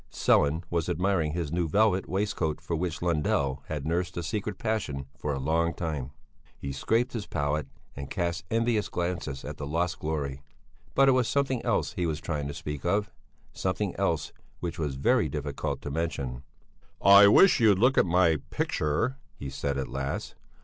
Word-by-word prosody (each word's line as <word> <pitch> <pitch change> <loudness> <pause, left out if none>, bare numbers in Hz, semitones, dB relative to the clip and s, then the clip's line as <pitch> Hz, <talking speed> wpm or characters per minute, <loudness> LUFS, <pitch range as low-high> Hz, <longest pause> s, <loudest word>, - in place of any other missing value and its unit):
Sellén 75 +4 +3
was 85 -2 0
admiring 90 -3 +1
his 85 -4 -2
new 85 0 0
velvet 100 +2 +2
waistcoat 95 -6 -1
for 80 +1 -3
which 85 0 -3
Lundell 70 -5 +1
had 75 -3 -4
nursed 85 +2 -1
a 85 - -2
secret 105 +4 -3
passion 100 -12 -2
for 75 - -3
a 70 - -1
long 85 +5 +1
time. 75 -6 -3 0.5
He 70 - -5
scraped 115 - 0
his 110 -4 -4
palette 75 0 -1 0.3
and 70 0 -6
cast 85 -2 -2
envious 115 -2 +1
glances 85 -6 -3
at 75 - -6
the 70 - -5
lost 85 +4 -1
glory. 70 -4 -3 0.5
But 135 0 +5
it - - +7
was 130 -3 +2
something 135 -3 0
else - - 0
he 90 - -1
was 75 -2 -2
trying 75 -4 -3
to 70 - -5
speak 75 -1 -5
of; 100 +2 0 0.4
something - - -2
else, - - -1 0.3
which 85 -1 -4
was 75 -4 -2
very 70 - +2
difficult 70 -2 -3
to 70 - -4
mention. 70 -5 -3 0.6
"I 100 +1 +8
wish 180 - +6
you'd 105 -5 +5
look 125 +6 +4
at - - +5
my 85 -2 +4
picture," 75 - 0 0.2
he 70 -1 -6
said 70 0 -2
at 70 - -2
last. 70 +1 -4
85 Hz, 175 wpm, -28 LUFS, 75-95 Hz, 0.6 s, I